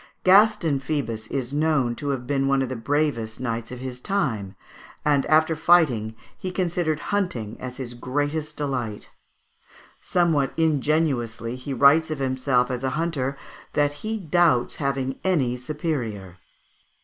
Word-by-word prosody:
Gaston 190 -6 +5
Phoebus 130 -6 -3
is 130 -1 -3
known 145 -5 +2
to 145 - -4
have 130 -3 -2
been 135 +1 0
one 135 -1 +2
of 130 - -3
the 130 - -3
bravest 115 -3 -1
knights 115 -2 -3
of 125 0 -7
his 125 -1 -6
time; 115 - -1 0.5
and, 145 -2 +2
after 160 +1 +4
fighting, 140 -10 +3 0.2
he 185 - -5
considered 175 -4 -1
hunting 125 - -1
as 125 -1 -7
his 125 -3 -6
greatest 145 +5 -2
delight. 125 -7 -3 0.9
Somewhat 160 -6 +1
ingenuously 145 -7 0
he 130 +2 -7
writes 140 +5 +5
of 155 - -2
himself 130 -1 +1
as 125 0 -3
a 130 - +1
hunter, 140 -5 -1 0.4
"that 145 0 +2
he 220 +1 -2
doubts 165 - +2
having 135 -2 -2
any 145 -10 +1
superior." 125 - -4
140 Hz, 140 wpm, -24 LUFS, 125-155 Hz, 0.9 s, Gaston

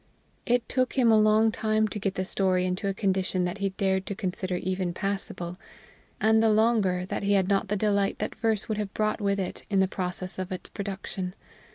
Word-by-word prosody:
It 245 -1 +2
took 255 -1 0
him 245 -4 +4
a 220 - +6
long 215 +1 +4
time 215 0 +1
to 210 - -5
get 195 -1 -2
the 185 - -1
story 185 -1 +1
into 185 +2 -2
a 195 - 0
condition 190 -2 0
that 180 +3 -3
he 200 -1 0
dared 190 0 0
to 200 - -3
consider 185 -1 -3
even 185 -1 -2
passable; 190 -3 -3 0.6
and 220 0 +4
the 225 - +4
longer 210 -5 +2
that - - -3
he 200 0 +2
had 190 -2 +3
not 200 +1 +1
the 205 - 0
delight 200 -1 +1
that 210 - -3
verse 220 -2 0
would 215 -1 -2
have 205 -1 -4
brought 215 0 0
with 200 -1 +1
it 185 - -4
in 200 -2 +2
the 190 - +4
process 185 0 -3
of 185 +1 -4
its 185 - -5
production. 195 -2 -5
195 Hz, 215 wpm, -27 LUFS, 185-215 Hz, 0.6 s, a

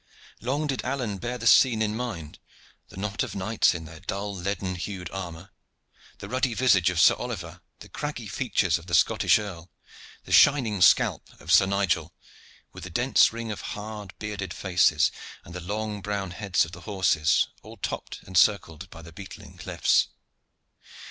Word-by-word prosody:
Long 140 +6 -1
did 135 -3 -2
Alleyne 125 -7 -3
bear 120 +3 -4
the 115 - -7
scene 115 -1 +6
in 110 -1 0
mind 105 -11 -5 0.5
the - - -13
knot 100 +1 -3
of - - -3
knights 100 0 +2
in 80 -1 -6
their 80 0 -11
dull 100 +2 -4
leaden 95 0 -3
hued 90 -1 -6
armor, 90 -1 -7 0.7
the 100 - -8
ruddy 125 +1 -1
visage 105 -8 +4
of 90 -2 -2
Sir - - +7
Oliver, - - -6 0.2
the - - -10
craggy - - -5
features - - 0
of 80 - -16
the 85 - +1
Scottish - - +4
earl, 95 -5 -7 0.5
the - - -11
shining 120 -9 +5
scalp - - +4
of 85 - -5
Sir 95 +2 +6
Nigel, 100 -2 0 0.6
with - - -10
the 90 - -7
dense 120 +9 +3
ring 115 -1 -5
of 105 - -6
hard, 105 -2 -7
bearded 105 -3 -5
faces 90 -5 +3 0.3
and 85 - -11
the 90 - -6
long 105 +3 -4
brown 100 -2 -3
heads 90 -1 +1
of 80 - -11
the 90 - -10
horses, 95 -5 +2
all - - -12
topped - - -5
and 95 - -11
circled 90 -4 +1
by 85 -1 -12
the 85 0 -12
beetling 95 +3 -11
cliffs. - - +2
100 Hz, 175 wpm, -26 LUFS, 90-110 Hz, 0.7 s, Sir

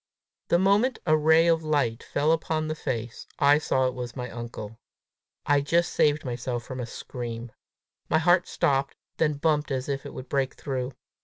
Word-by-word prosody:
The 170 - +4
moment 200 +8 +3
a 155 -2 +4
ray 160 +2 +5
of 165 -1 +3
light 145 -7 0
fell 150 +2 0
upon 160 -1 0
the 155 - -1
face, 120 -6 -4
I 145 0 +5
saw 130 -3 +1
it 130 - 0
was 125 -1 -6
my 125 -2 -5
uncle. 115 -2 -7 0.7
I 145 -1 +3
just 170 +4 +1
saved 150 -1 +2
myself 120 -1 -3
from 130 +2 -7
a 120 - -4
scream. 120 -1 -6 0.6
My 160 - +4
heart 175 +2 +3
stopped, 135 0 0 0.2
then 155 -2 +2
bumped 150 0 +1
as 130 -2 -2
if 140 -1 -2
it - - -10
would 130 - -7
break 135 -1 -1
through. 130 -1 -4
140 Hz, 180 wpm, -26 LUFS, 125-155 Hz, 0.7 s, ray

